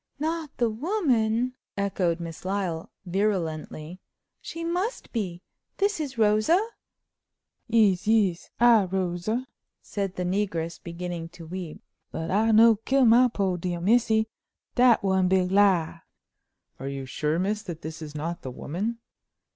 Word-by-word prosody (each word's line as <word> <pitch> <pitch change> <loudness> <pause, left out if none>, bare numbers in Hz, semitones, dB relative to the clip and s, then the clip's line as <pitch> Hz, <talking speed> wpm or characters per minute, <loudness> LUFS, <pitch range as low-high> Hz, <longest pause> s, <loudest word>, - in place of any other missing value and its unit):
"Not 320 +1 -2
the 235 -2 +1
woman?" 250 - +1 0.2
echoed 185 -4 0
Miss 165 -2 -7
Lyle, 185 -4 -2 0.2
virulently. 175 -3 -2 0.4
"She 330 - -6
must 360 +8 -3
be! 185 -6 -3 0.3
This 405 -2 +1
is 280 -5 -4
Rosa!" 215 - +4 1.1
"Yis, 210 -5 +3
yis! 205 -6 +2
I 235 -4 +6
Rosa," 185 +6 -2 0.3
said 195 -2 -4
the 180 - -2
negress, 175 -3 -2
beginning 170 -1 -5
to 165 - -9
weep, 175 -1 -7 0.3
"but 160 0 -4
I 215 +4 +3
no 225 0 +6
kill 265 +4 +2
my 240 +2 +6
poo' 195 -6 -1
dear 175 0 -3
missy. 220 +3 +3 0.5
Dat 245 -4 +5
one 190 -1 +2
big 185 0 +2
lie." 185 -5 +3 0.8
"Are 135 - -5
you 135 -1 -4
sure, 150 +4 -1
miss, 205 +4 0
that 170 -6 -8
this 160 +1 -7
is 155 -1 -8
not 170 +3 -4
the 130 - -6
woman?" 185 - -4
195 Hz, 140 wpm, -26 LUFS, 170-230 Hz, 1.1 s, I